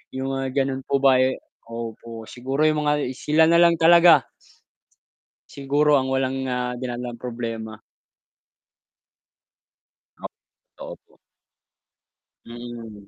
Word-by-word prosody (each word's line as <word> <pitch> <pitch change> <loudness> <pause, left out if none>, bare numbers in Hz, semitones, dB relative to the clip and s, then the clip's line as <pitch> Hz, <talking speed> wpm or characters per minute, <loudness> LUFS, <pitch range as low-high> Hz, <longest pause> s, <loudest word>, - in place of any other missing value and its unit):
yung 135 +1 -3
mga 135 +1 -1
ganun 135 0 -4
po 140 +1 -1
ba 135 -2 +5
ay 130 0 0 0.3
opo 115 -1 -8
siguro 135 +4 -4
yung 150 -1 -1
mga 150 -3 0
sila 160 +2 +2
nalang 170 0 +5
talaga 170 -3 +6 1.2
siguro 145 +1 +1
ang 130 - -3
walang 135 0 -1
na 125 -1 -2
dinadalang 120 -1 -6
problema. 115 -2 -6 2.4
Ah, - - -11 0.5
totoo - - -9
po. - - -30 1.3
Mm, 115 -3 -10
130 Hz, 105 wpm, -22 LUFS, 120-145 Hz, 2.4 s, talaga